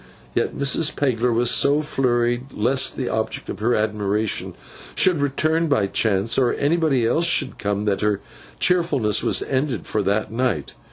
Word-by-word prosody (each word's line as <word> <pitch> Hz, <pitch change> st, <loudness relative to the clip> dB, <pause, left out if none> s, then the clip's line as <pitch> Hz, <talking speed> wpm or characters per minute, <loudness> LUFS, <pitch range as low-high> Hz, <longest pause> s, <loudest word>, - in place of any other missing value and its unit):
Yet -, -, -1 dB
Mrs. 145 Hz, +2 st, 0 dB
Pegler 125 Hz, -3 st, +1 dB
was 120 Hz, +1 st, +2 dB
so 145 Hz, +2 st, +3 dB
flurried 125 Hz, -2 st, -1 dB
lest 130 Hz, +5 st, +1 dB
the 130 Hz, -, -2 dB
object 110 Hz, 0 st, -3 dB
of -, -, -5 dB
her 120 Hz, +3 st, +1 dB
admiration 105 Hz, 0 st, -1 dB, 0.4 s
should 180 Hz, -6 st, +2 dB
return 155 Hz, +4 st, +1 dB
by 135 Hz, -9 st, +2 dB
chance, 100 Hz, +2 st, 0 dB
or 125 Hz, -2 st, +2 dB
anybody 145 Hz, -5 st, +1 dB
else 160 Hz, +9 st, +2 dB
should 140 Hz, -5 st, 0 dB
come, 100 Hz, 0 st, -2 dB
that 100 Hz, -2 st, 0 dB
her 105 Hz, -2 st, +1 dB, 0.4 s
cheerfulness 150 Hz, -, +1 dB
was -, -, +1 dB
ended 130 Hz, -4 st, -2 dB
for 105 Hz, -, -1 dB
that 105 Hz, +2 st, -1 dB
night. 115 Hz, -, -1 dB
120 Hz, 160 wpm, -22 LUFS, 105-140 Hz, 0.4 s, so